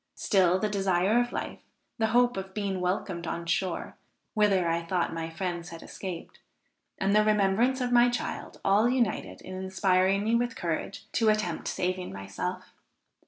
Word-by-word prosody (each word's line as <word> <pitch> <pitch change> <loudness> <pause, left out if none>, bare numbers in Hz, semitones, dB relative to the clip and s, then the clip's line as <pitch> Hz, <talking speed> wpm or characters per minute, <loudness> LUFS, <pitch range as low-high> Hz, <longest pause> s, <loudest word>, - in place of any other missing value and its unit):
Still 185 -3 +3
the 215 - 0
desire 195 +1 +2
of 245 0 0
life, - - -4 0.4
the 220 - +3
hope 245 +2 +3
of 190 0 -6
being 195 -3 -2
welcomed 180 -1 -2
on 170 0 -3
shore, 175 +1 -2 0.4
whither 200 -5 +3
I 165 0 +1
thought 170 0 -1
my 165 0 -4
friends 175 0 -4
had 165 -1 -9
escaped, 180 -4 -7 0.6
and 195 +1 +1
the 215 - +6
remembrance 215 +5 +2
of 245 0 -1
my 240 0 +6
child, 240 0 -4
all 205 +4 +4
united 215 - -1
in 185 - -9
inspiring 190 +1 +1
me 220 +2 +1
with 235 0 +1
courage 175 +4 -3
to 225 -2 +3
attempt 210 -6 0
saving 185 0 -2
myself. 95 0 -5
190 Hz, 165 wpm, -28 LUFS, 175-215 Hz, 0.6 s, the